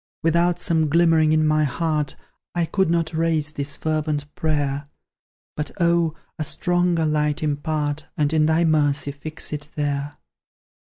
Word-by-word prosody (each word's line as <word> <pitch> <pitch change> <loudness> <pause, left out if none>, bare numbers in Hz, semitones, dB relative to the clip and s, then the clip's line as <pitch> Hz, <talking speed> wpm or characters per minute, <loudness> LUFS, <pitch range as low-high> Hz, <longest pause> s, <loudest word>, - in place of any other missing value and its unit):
Without 170 +2 +2
some 160 -3 +1
glimmering 165 -1 +4
in 155 0 +3
my 155 0 +3
heart, 150 +1 -1 0.4
I 170 -1 +2
could 190 +1 +1
not 165 -1 0
raise 160 -2 +1
this 140 -1 -3
fervent 150 -2 -2
prayer; 145 -2 -1 0.7
But, 150 - -2
oh! 170 -2 +2 0.2
a - - 0
stronger 175 +1 +1
light 150 0 0
impart, 150 0 -2
And 150 0 +1
in 155 -1 +3
Thy 160 +2 +3
mercy 145 -3 +2
fix 155 +2 -6
it 150 0 -5
there. 145 -1 -2
155 Hz, 145 wpm, -23 LUFS, 145-165 Hz, 0.7 s, glimmering